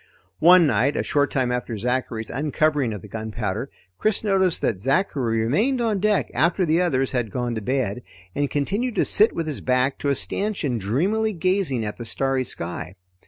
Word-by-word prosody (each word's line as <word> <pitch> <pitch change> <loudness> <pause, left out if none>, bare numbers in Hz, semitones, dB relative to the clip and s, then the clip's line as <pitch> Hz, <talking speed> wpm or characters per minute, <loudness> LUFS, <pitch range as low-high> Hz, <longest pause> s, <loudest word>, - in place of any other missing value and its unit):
One 175 +1 +7
night 140 0 +1
a - - 0
short 145 -1 +1
time 130 -2 0
after 125 -2 -3
Zachary's 120 -1 -2
uncovering 145 -1 0
of 105 -4 -7
the - - -9
gunpowder, 110 +2 -4 0.3
Chris 215 0 +1
noticed 190 -4 +2
that 95 - 0
Zachary 130 - 0
remained 215 - +1
on 225 -4 0
deck 210 +1 +1
after 175 +3 +2
the 165 +2 +2
others 135 -7 0
had 120 -4 -1
gone 120 +2 -2
to 110 - -4
bed, 125 -1 -1 0.3
and 145 -1 -1
continued 200 - -1
to - - +2
sit 215 +2 +5
with 165 - -2
his 150 -3 -4
back 130 +1 +1
to 145 - -1
a 140 - +2
stanchion 180 - -1
dreamily 190 - 0
gazing 175 - 0
at 105 - -5
the 120 - -7
starry 130 +4 0
sky. 90 -5 -5
135 Hz, 185 wpm, -23 LUFS, 120-180 Hz, 0.3 s, One